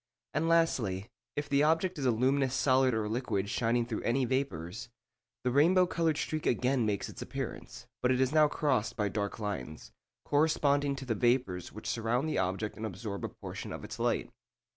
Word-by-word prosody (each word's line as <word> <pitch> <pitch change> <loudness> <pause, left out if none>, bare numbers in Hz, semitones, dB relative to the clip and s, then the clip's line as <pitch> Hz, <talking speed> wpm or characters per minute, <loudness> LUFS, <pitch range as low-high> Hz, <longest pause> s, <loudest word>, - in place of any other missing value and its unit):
And 160 +2 +1
lastly, 115 - +1 0.2
if 145 0 -2
the 140 -1 +3
object 165 +3 +2
is 135 - 0
a - - +5
luminous 130 +3 +2
solid 130 -1 +4
or 110 -1 -1
liquid 110 -3 -1
shining 120 0 +1
through 115 -2 -3
any 130 +3 +1
vapours, 120 - -3 0.5
the 125 - +1
rainbow 175 +7 +5
coloured 165 -3 0
streak 155 0 -2
again 125 -1 +2
makes 100 -2 -1
its - - -9
appearance, - - -6 0.2
but 125 - +2
it 130 0 +2
is 130 0 +2
now 155 -1 +6
crossed 140 -7 0
by 105 -4 0
dark 100 0 -3
lines, 95 - -5 0.3
corresponding 145 -2 +2
to 135 - -7
the 120 - 0
vapours 120 -6 +1
which 110 - -8
surround 120 +5 0
the 155 - 0
object 95 +3 -2
and 110 - -4
absorb 100 +1 -6
a - - -2
portion - - -7
of - - -6
its - - -8
light. - - 0
125 Hz, 185 wpm, -31 LUFS, 110-145 Hz, 0.5 s, now